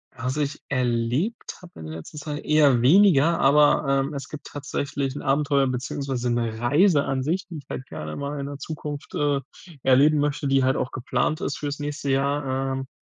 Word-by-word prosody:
Was 130 +4 -3
ich 145 0 -2
erlebt 125 - -1
habe 175 - -14
in 80 - -8
der 80 - -7
letzten 80 - -11
Zeit? 150 -1 -5
Eher 145 -5 +4
weniger, 170 +1 +5
aber, 145 +1 +4
ähm, 135 +2 +1
es 140 -1 -6
gibt 150 -1 -9
tatsächlich 140 -1 -3
'n - - -5
Abenteuer, 140 0 +2
beziehungsweise 130 0 -3
'ne 115 -2 -1
Reiseansicht, 145 +3 +2
die 170 - -7
ich - - -17
halt 130 - -5
gerne 75 0 -7
mal 145 +1 -4
in 140 - -4
der 145 - -6
Zukunft, 150 -1 -7
äh, 145 -1 +1 0.4
erleben 140 +4 +5
möchte, 145 0 -1
die 135 -1 +3
halt 130 +1 +2
auch 130 - -2
geplant 130 +3 -1
ist 140 - -2
fürs 145 0 -4
nächste 145 -1 -4
Jahr, 140 +2 0 0.3
ähm. 135 0 -5
140 Hz, 185 wpm, -24 LUFS, 130-150 Hz, 0.4 s, weniger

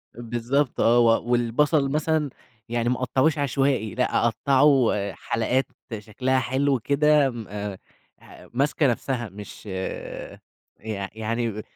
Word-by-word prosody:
بالضبط 120 +4 -1
آه، 120 +1 +5
و 115 -1 +4
والبصل 135 +4 +2
مثلًا 155 -1 +1 0.4
يعني 120 0 0
ما 125 - +2
أقطّعوش 135 +5 +2
عشوائي 135 -6 0
لأ، 125 -1 +1
أقطّعه 135 +1 +4 0.2
حلقات 125 +3 0 0.3
شكلها 125 +5 0
حلو 130 +1 +1
كده 145 +2 +3
م 115 -4 -7 0.8
ح - - -15
ماسكة 140 +2 +2
نفسها، 120 -2 -2
مش 105 +2 -11
يع 100 +1 -7
يعني 110 -1 -2
125 Hz, 110 wpm, -24 LUFS, 115-140 Hz, 0.8 s, آه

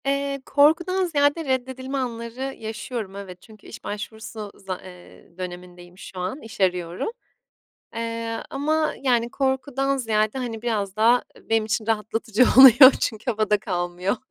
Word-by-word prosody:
Eee, 275 0 -1
korkudan 345 +6 +3
ziyade 295 0 +1
reddedilme 260 +1 -2
anları 245 +1 -4
yaşıyorum, 220 -2 -6
evet. 185 -3 -9
Çünkü 215 -2 -17
iş - - -11
başvurusu 215 0 -7
za 190 -1 -6
ııı, 180 -1 -14
dönemindeyim 180 -1 -9
şu 190 - -10
an, 185 +11 -4
iş 225 -3 -10
arıyorum. 180 - 0 0.9
Eee, 230 0 -4
ama, 310 +3 0
yani, 240 -3 +1
korkudan 270 +1 -1
ziyade, 220 -1 0
hani, 230 -3 -5
biraz 210 -4 -2
da, 235 +3 +4
ııı, - - -20
benim 225 -1 +2
için 215 0 -2
rahatlatıcı 225 +1 +1
oluyor 260 0 +10
çünkü 220 +2 -2
havada 215 -2 +1
kalmıyor. 180 0 -2
225 Hz, 140 wpm, -23 LUFS, 200-265 Hz, 0.9 s, oluyor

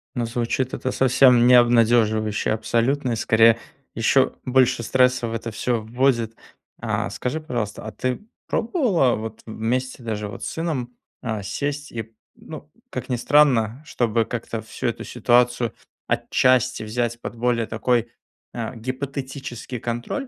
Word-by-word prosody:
Ну, 120 -2 -1
звучит 120 +2 -2
это 130 - -2
совсем 125 -2 +5
не 125 - +7
обнадеживающе 115 -3 +3
абсолютно, 120 +5 0
и - - 0
скорее 115 +1 +5 0.4
еще 130 +3 +3
больше 130 -1 +3
стресса 125 0 +2
в 115 - -5
это 115 0 -4
всё 115 +2 -1
вводит. 115 0 0 0.4
А, - - -2
скажи, 135 +5 -3
пожалуйста, 120 -10 -4
а 110 - -5
ты 125 +4 -2 0.3
пробовала 215 - +1
вот 110 0 -7
вместе 125 +4 -3
даже 105 -2 -3
вот 105 - -8
с - - -3
сыном, 140 -7 -3 0.3
а, 110 -4 -3
сесть 145 +8 -3
и, 115 -1 -6 0.2
ну, - - -11 0.2
как - - -5
ни 125 - 0
странно, 125 -3 +3
чтобы 115 -5 0
как-то 115 -1 -4
всю 110 +3 -5
эту 115 - -3
ситуацию 120 0 +2 0.3
отчасти 130 -2 +2
взять 120 +2 -2
под - - -6
более 120 -1 +1
такой, 115 +1 0 0.4
а, 120 +1 -4
гипотетический 130 0 -5
контроль. 120 - -4
120 Hz, 140 wpm, -23 LUFS, 115-130 Hz, 0.4 s, не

